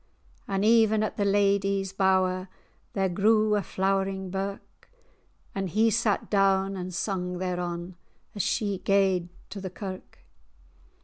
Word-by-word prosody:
And 195 +1 0
even 220 -1 +4
at 215 - -3
the 205 - +1
ladye's 200 -1 +1
bour[#] 185 -1 +2 0.5
There 195 -1 +1
grew 215 +3 +3
a 205 - +1
flowering 190 -1 -1
birk; 195 +1 -6 0.6
And 195 -1 -2
he 220 +5 +3
sat 225 -2 +1
down 195 -1 +2
and 185 -1 -5
sung 180 0 -2
thereon 175 -1 -4 0.4
As 205 - -2
she 200 0 -1
gaed 190 -3 +2 0.2
to 200 0 -6
the 190 - -4
kirk. 185 0 -9
195 Hz, 130 wpm, -27 LUFS, 185-200 Hz, 0.6 s, even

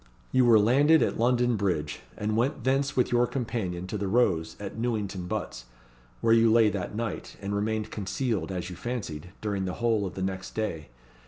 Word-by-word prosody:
You 130 -1 +4
were 115 -2 +7
landed 140 +9 +5
at - - -1
London 120 0 +3
Bridge, 90 -8 -1 0.2
and 105 +1 -1
went 125 +6 0
thence 135 +2 +1
with 125 - +2
your 120 0 +3
companion 110 -9 -3
to 100 +3 -4
the 100 - -1
Rose 95 -7 +1
at 100 -1 -6
Newington 105 -6 -2
Butts, - - -4 0.6
where 115 - +4
you 115 -1 +5
lay 115 -1 +5
that 100 +1 -4
night, 115 -3 -4
and 100 0 -4
remained 110 +1 -1
concealed, 105 +1 -2
as 90 -1 -4
you - - -7
fancied, 90 -9 -5
during 100 -3 -1
the 90 - -3
whole 115 -3 +1
of 90 - -9
the 95 - -3
next 95 0 -4
day. 85 - -3
110 Hz, 190 wpm, -28 LUFS, 95-120 Hz, 0.6 s, were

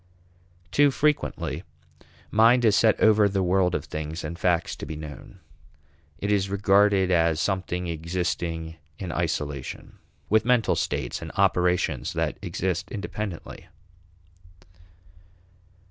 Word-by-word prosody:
Too 145 0 +5
frequently 140 - -1 0.7
mind 115 +3 +5
is 105 -2 +5
set 110 -1 +4
over 110 -1 +5
the 95 -1 0
world 90 0 +2
of - - -3
things 80 +2 -5
and 80 +2 -5
facts 85 -2 +1
to - - -7
be 80 - -5
known; 75 +4 -10 0.8
it 100 +6 -2
is 100 -2 +1
regarded 100 -1 +3
as 80 -2 +3
something 90 -1 -1
existing 85 -1 -3 0.2
in 90 -3 -5
isolation, 70 -2 -4 0.3
with 110 +1 +3
mental 120 -2 +2
states - - -2
and - - -7
operations 90 -7 +1
that - - -2
exist 90 -1 -2
independently. 105 -4 -6
90 Hz, 115 wpm, -25 LUFS, 80-105 Hz, 0.8 s, Too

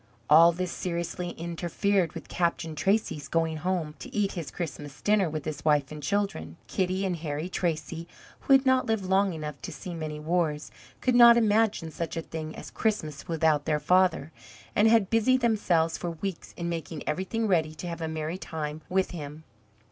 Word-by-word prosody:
All 165 +3 +9
this 180 +1 -3
seriously 175 0 -3
interfered 175 +2 -1
with - - -8
Captain 170 -2 -1
Tracy's 190 -3 0
going 165 -1 0
home 170 -2 -2
to - - -9
eat 205 -2 0
his 165 -7 -5
Christmas 145 -4 -6
dinner 205 0 +2
with 155 -2 -5
his 155 -2 -5
wife 145 -2 +2
and 150 0 -7
children. 170 - -2
Kitty 185 +8 -1
and 180 -2 -1
Harry 155 0 -3
Tracy, 170 -2 -3 0.3
who 275 - +2
had 270 0 +6
not 260 0 +3
lived 220 -4 0
long 190 +1 +3
enough 150 -4 -6
to - - -6
see 180 - -7
many 155 -2 -5
wars, 155 -1 -1 0.3
could 255 - +2
not 235 -1 +9
imagine 215 -6 +2
such 165 +1 -4
a 165 - -2
thing 155 -1 -6
as - - -9
Christmas 160 -10 -2
without 160 -3 +2
their 150 -1 +1
father, 180 -3 +2 0.4
and 210 - +5
had 220 -4 +4
busied 255 +3 +3
themselves 175 -8 +2
for 175 - -3
weeks 170 +2 -6
in 170 - -3
making 165 -2 -4
everything 190 +8 -1
ready 160 -5 +1
to 165 - -7
have 170 -1 -5
a 160 - -1
merry 160 +3 -3
time 155 -2 -5
with 190 0 +1
him. 155 -2 -7
170 Hz, 185 wpm, -28 LUFS, 155-195 Hz, 0.4 s, All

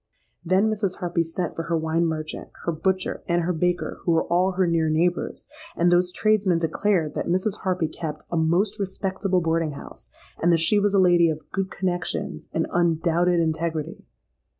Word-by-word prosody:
Then 185 +4 +3
Mrs. 205 -4 -1
Harpy 175 -1 -1
sent 165 +1 -3
for - - -2
her 165 - +2
wine 160 +1 +1
merchant, 155 -1 -5 0.2
her 170 - +1
butcher, 185 +4 -1
and 170 0 +1
her 180 +2 0
baker, 180 +2 -1
who 170 - +1
were 165 - +3
all 185 +2 +1
her 185 0 +2
near 165 -2 +1
neighbours: 175 +3 0 0.3
and 175 +1 +3
those 180 0 +3
tradesmen 205 -4 +2
declared 165 0 0
that - - -3
Mrs. 185 +4 0
Harpy 185 -4 0
kept 155 -1 -6
a - - -1
most 170 +6 +1
respectable 190 -1 -1
boarding 165 -2 0
house, - - -11 0.3
and 175 - +4
that 165 - +4
she 185 +6 +3
was 205 0 +1
a - - +5
lady 175 -2 +5
of 155 -1 -6
good 195 -1 -2
connexions 180 -2 -3
and 165 - 0
undoubted 170 +1 +2
integrity. 160 -1 -2
175 Hz, 180 wpm, -24 LUFS, 165-185 Hz, 0.3 s, a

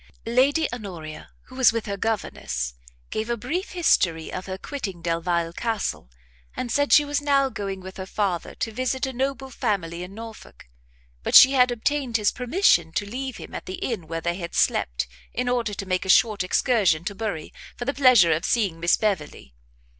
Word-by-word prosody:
Lady 270 +7 +3
Honoria, 175 -10 -8
who 255 - -15
was 260 -2 +5
with 230 -1 -3
her 200 - -3
governess, 195 - -3 0.4
gave 220 +2 -3
a 235 - 0
brief 315 - -4
history 170 - +2
of 185 - -5
her 190 0 -4
quitting 200 - -6
Delvile 170 0 -1
Castle, 220 - -3 0.5
and 245 - -3
said 285 +4 +1
she 295 - +7
was 290 0 -1
now 280 -2 +2
going 195 -5 -5
with 190 0 -10
her 190 -1 -6
father 190 -4 -2
to 225 - -3
visit 255 +4 -1
a 265 - -5
noble 265 +1 -3
family 180 -9 -2
in 180 +2 -8
Norfolk; 225 - -11 0.5
but - - -1
she 265 - +10
had 250 -2 +4
obtained 245 +1 0
his 210 -2 +2
permission 250 - +2
to 205 - -1
leave 255 +4 -5
him - - -10
at - - -7
the 185 - -4
inn 195 -9 -4
where 165 +1 -4
they 175 +1 -2
had 170 -2 -6
slept, - - +1 0.3
in 250 0 -1
order 240 -4 0
to 195 - -5
make 185 -1 -1
a 190 - -7
short 210 -1 +4
excursion 185 -5 +2
to 190 - -3
Bury, 200 -7 -5 0.2
for 240 - -5
the 275 - 0
pleasure 255 - +6
of 160 +2 +1
seeing 200 -9 0
Miss 170 +1 +3
Beverley. 150 - -3
215 Hz, 190 wpm, -24 LUFS, 175-255 Hz, 0.5 s, she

